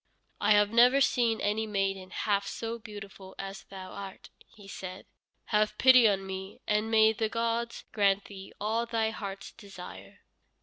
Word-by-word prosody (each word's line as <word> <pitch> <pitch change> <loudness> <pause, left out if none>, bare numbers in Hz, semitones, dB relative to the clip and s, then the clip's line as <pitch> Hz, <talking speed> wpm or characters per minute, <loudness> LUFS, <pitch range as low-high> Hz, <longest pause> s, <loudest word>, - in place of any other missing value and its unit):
"I 210 +1 +4
have 205 0 +4
never 245 +4 +6
seen 235 -5 +2
any 215 +2 0
maiden 195 -2 -2
half 200 0 -1
so 230 +2 -4
beautiful 200 -3 -10
as 195 0 -7
thou 190 -1 -9
art," 195 -1 -9 0.2
he 205 -2 -16
said. 185 -1 -8 0.5
"Have 210 0 +2
pity 255 -3 +7
on 195 -1 -1
me, 190 0 -7
and 210 +1 0
may 220 0 +5
the 220 0 -1
gods 230 +1 -2
grant 200 -1 +2
thee 195 -1 -10
all 225 +3 -1
thy 225 -1 0
heart's 200 -3 -7
desire." 195 -4 -12
210 Hz, 160 wpm, -29 LUFS, 195-225 Hz, 0.5 s, pity